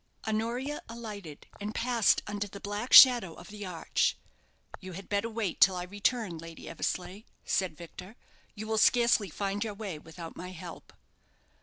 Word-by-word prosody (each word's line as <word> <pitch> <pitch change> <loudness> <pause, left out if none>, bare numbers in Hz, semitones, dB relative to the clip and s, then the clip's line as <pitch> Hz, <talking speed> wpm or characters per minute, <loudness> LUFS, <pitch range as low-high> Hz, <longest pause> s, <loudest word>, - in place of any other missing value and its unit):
Honoria 235 +7 -2
alighted, 210 -9 -8
and 210 +1 -5
passed 235 -2 +2
under 205 0 -3
the 200 0 -10
black 205 +5 -4
shadow 240 -10 +9
of 175 - -12
the 205 -1 -7
arch. 170 -3 0 0.6
"You 185 -1 -9
had 195 +2 -9
better 205 +3 0
wait 220 -5 -3
till 190 -1 +7
I 180 - -3
return, 205 -1 -1
Lady 165 0 -10
Eversleigh," 185 +3 -3 0.2
said 185 -5 0
Victor. 180 +5 -10 0.4
"You 215 +1 -6
will 220 0 0
scarcely 235 -3 +4
find 200 +5 -2
your 215 -2 -5
way 200 -7 -6
without 165 +1 -10
my 180 - -7
help." 170 -1 -10
205 Hz, 160 wpm, -30 LUFS, 180-220 Hz, 0.6 s, shadow